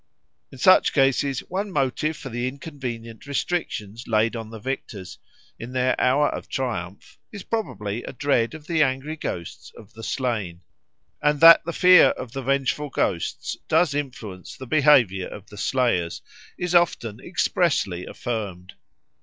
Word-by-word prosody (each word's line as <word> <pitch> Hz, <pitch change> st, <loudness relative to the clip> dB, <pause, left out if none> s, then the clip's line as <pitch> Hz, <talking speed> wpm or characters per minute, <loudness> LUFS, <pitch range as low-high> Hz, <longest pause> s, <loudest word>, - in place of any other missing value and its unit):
In 135 Hz, -, -12 dB
such 185 Hz, +8 st, +5 dB
cases 135 Hz, -1 st, +2 dB
one 195 Hz, +3 st, -4 dB
motive 150 Hz, +1 st, -1 dB
for 135 Hz, -, -8 dB
the 120 Hz, +1 st, -2 dB
inconvenient 130 Hz, -4 st, -7 dB
restrictions 125 Hz, -, -3 dB
laid 110 Hz, +1 st, +2 dB
on 110 Hz, -1 st, -6 dB
the 115 Hz, -, -8 dB
victors 105 Hz, -5 st, -6 dB, 0.4 s
in 120 Hz, +2 st, -8 dB
their 130 Hz, 0 st, +2 dB
hour 145 Hz, +3 st, +3 dB
of -, -, -7 dB
triumph 100 Hz, -8 st, -5 dB
is 200 Hz, -3 st, -8 dB
probably 115 Hz, -, -3 dB
a -, -, -6 dB
dread 135 Hz, -1 st, 0 dB
of 155 Hz, -2 st, -11 dB
the 160 Hz, -1 st, +1 dB
angry 135 Hz, +2 st, 0 dB
ghosts 85 Hz, -, -6 dB
of 105 Hz, +1 st, -15 dB
the 115 Hz, -, -11 dB
slain; 110 Hz, -9 st, -3 dB, 0.6 s
and 150 Hz, 0 st, +2 dB
that 165 Hz, 0 st, +9 dB
the 170 Hz, -, -2 dB
fear 180 Hz, +1 st, +7 dB
of 125 Hz, -, -3 dB
the 135 Hz, +2 st, -5 dB
vengeful 140 Hz, +2 st, 0 dB
ghosts 85 Hz, -9 st, -2 dB
does 160 Hz, -1 st, +3 dB
influence 120 Hz, -10 st, -6 dB
the 130 Hz, -, -8 dB
behaviour 125 Hz, -10 st, +4 dB
of 100 Hz, -, -10 dB
the 105 Hz, -, -11 dB
slayers 110 Hz, -10 st, 0 dB, 0.3 s
is 180 Hz, -1 st, -2 dB
often 120 Hz, -11 st, +2 dB
expressly 140 Hz, -, 0 dB
affirmed. 100 Hz, -6 st, -5 dB
130 Hz, 150 wpm, -24 LUFS, 110-150 Hz, 0.6 s, that